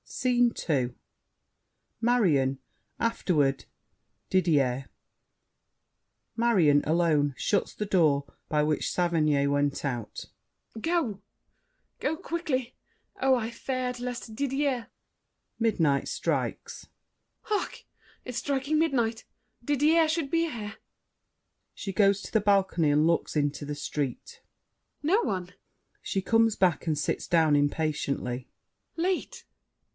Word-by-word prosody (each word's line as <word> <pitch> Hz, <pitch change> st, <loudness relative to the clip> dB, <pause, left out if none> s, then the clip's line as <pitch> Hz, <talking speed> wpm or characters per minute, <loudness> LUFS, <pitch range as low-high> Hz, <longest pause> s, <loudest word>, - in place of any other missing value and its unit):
SCENE 245 Hz, -1 st, +1 dB, 0.2 s
II 130 Hz, -6 st, +1 dB, 1.1 s
Marion, 160 Hz, -, +2 dB, 0.4 s
afterward 150 Hz, -, +1 dB, 0.6 s
Didier 140 Hz, -8 st, +2 dB, 1.5 s
MARION 185 Hz, -12 st, +4 dB
(alone, 155 Hz, -3 st, +2 dB
shuts 200 Hz, -, 0 dB
the 210 Hz, -, -3 dB
door 155 Hz, -8 st, +3 dB, 0.2 s
by 150 Hz, -1 st, +2 dB
which 150 Hz, -1 st, 0 dB
Saverny 155 Hz, -5 st, +2 dB
went 145 Hz, 0 st, 0 dB
out). 120 Hz, -5 st, -4 dB, 0.5 s
Go— 275 Hz, -, -1 dB, 0.8 s
Go 320 Hz, -, -1 dB
quickly! 305 Hz, -8 st, -3 dB, 0.5 s
Oh, 265 Hz, 0 st, +4 dB
I 235 Hz, -2 st, -2 dB
feared 250 Hz, 0 st, -3 dB
lest 245 Hz, -2 st, -5 dB
Didier— 270 Hz, -2 st, -1 dB, 0.7 s
[Midnight 165 Hz, -, +2 dB
strikes. -, -, -3 dB, 0.6 s
Hark! 420 Hz, -1 st, -2 dB, 0.4 s
It's 245 Hz, -2 st, -3 dB
striking 280 Hz, +3 st, 0 dB
midnight! 235 Hz, -8 st, +1 dB, 0.4 s
Didier 300 Hz, +5 st, +3 dB
should 315 Hz, -3 st, -1 dB
be 335 Hz, 0 st, +2 dB
here! 220 Hz, -5 st, -6 dB, 1.0 s
[She 195 Hz, -, -5 dB
goes 200 Hz, -1 st, +3 dB
to -, -, -8 dB
the 220 Hz, -, +4 dB
balcony 190 Hz, -6 st, +2 dB
and 150 Hz, +2 st, +3 dB
looks 170 Hz, -1 st, 0 dB
into 145 Hz, 0 st, -1 dB
the 145 Hz, 0 st, -4 dB
street. 145 Hz, -, -4 dB, 0.6 s
No 380 Hz, +10 st, +3 dB
one! 180 Hz, -, -3 dB, 0.5 s
[She 195 Hz, -, -2 dB
comes 225 Hz, +1 st, +3 dB
back 180 Hz, -3 st, +2 dB
and 155 Hz, -2 st, +1 dB
sits -, -, -2 dB
down 160 Hz, -3 st, +4 dB
impatiently. 145 Hz, -4 st, -1 dB, 0.5 s
Late! 360 Hz, +2 st, -2 dB
195 Hz, 105 wpm, -28 LUFS, -, 1.5 s, MARION